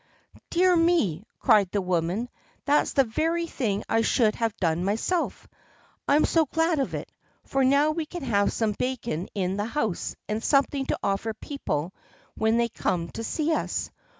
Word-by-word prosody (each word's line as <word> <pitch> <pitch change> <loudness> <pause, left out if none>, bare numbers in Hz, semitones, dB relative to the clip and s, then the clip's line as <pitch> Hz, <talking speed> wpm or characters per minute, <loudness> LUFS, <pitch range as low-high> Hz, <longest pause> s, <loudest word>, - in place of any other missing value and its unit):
"Dear 360 +1 +4
me!" 330 - +2
cried 200 -3 +4
the 205 - 0
woman, 180 +4 -1 0.4
"that's 295 +1 +2
the 275 - +5
very 325 +8 0
thing 215 -10 -2
I 225 - +2
should 225 -1 +3
have 230 -3 -2
done 165 0 0
myself. 225 - -1 0.6
I'm 295 +2 +4
so 325 -2 +2
glad 325 +1 +1
of 270 - 0
that, - - -6 0.3
for 270 0 0
now 280 +3 +4
we 310 0 -3
can 350 -1 -7
have 205 -5 +2
some 220 -2 0
bacon 240 -9 -2
in 190 -1 -1
the 205 - -1
house 225 -6 -2
and 215 +1 -2
something 275 -1 +2
to - - 0
offer 200 +3 -1
people 185 - -4 0.4
when 220 +1 +1
they 235 0 +2
come 170 -6 -2
to 225 - -6
see 310 +7 0
us. - - -2
230 Hz, 170 wpm, -26 LUFS, 200-300 Hz, 0.6 s, the